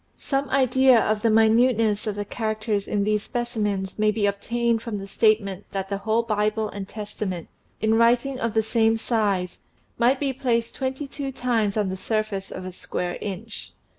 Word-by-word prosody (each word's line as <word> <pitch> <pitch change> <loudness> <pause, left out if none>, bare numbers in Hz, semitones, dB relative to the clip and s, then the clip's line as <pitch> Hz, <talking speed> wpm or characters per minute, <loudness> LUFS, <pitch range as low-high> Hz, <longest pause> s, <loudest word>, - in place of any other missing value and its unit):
Some 275 -1 -1
idea 260 -1 +5
of 215 -1 +1
the 230 - +3
minuteness 220 -1 +3
of 210 - -1
the 205 0 -3
characters 215 -2 -2
in 205 -1 0
these 210 0 +1
specimens 210 -6 -2
may 215 0 +4
be 210 -1 +1
obtained 230 +3 0
from 230 -3 -4
the 195 - -6
statement 200 -2 +1
that 195 -1 -3
the 200 -1 -2
whole 220 +3 +1
Bible 215 -1 0
and 200 -2 -6
Testament, 205 -5 -5 0.3
in 220 0 +3
writing 240 +4 +3
of 230 -2 -2
the 220 - +3
same 225 0 +2
size, 205 -6 0 0.4
might 255 +3 +4
be 275 -2 0
placed 235 -3 0
twenty 265 +2 -3
two 275 0 -5
times 230 -5 0
on 205 -3 +1
the 190 - -4
surface 215 -2 -2
of 185 - -7
a 185 - -6
square 175 0 -4
inch. 210 +3 -6
220 Hz, 180 wpm, -24 LUFS, 205-235 Hz, 0.4 s, idea